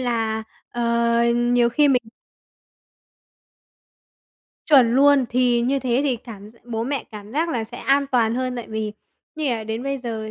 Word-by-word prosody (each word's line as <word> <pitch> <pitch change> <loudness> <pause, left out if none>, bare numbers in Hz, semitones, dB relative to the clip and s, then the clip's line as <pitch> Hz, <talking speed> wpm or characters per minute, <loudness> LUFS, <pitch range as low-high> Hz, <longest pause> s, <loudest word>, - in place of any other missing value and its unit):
là, 225 -3 -1 0.3
ờ, 240 0 -4 0.5
nhiều 240 0 +2
khi 290 +4 +3
mình 250 -2 +3 2.6
Chuẩn 255 -6 +5
luôn, 280 0 +5
thì 245 -1 +2
như 270 +3 +1
thế 250 -1 0
thì 270 -4 0
cảm 215 -3 -11
gi 230 - -23
bố 225 -2 -3
mẹ 275 0 -3
cảm 210 0 -10
giác 320 +5 0
là 240 -8 -2
sẽ 220 - -11
an 280 +1 +2
toàn 235 -4 +1
hơn 255 0 -2
tại 240 - -6
vì 220 -1 -3 0.4
như 305 -3 -1
là 225 -2 -3
đến 220 +2 -4
bây 275 0 -3
giờ 225 -3 -5
240 Hz, 170 wpm, -22 LUFS, 225-270 Hz, 2.6 s, Chuẩn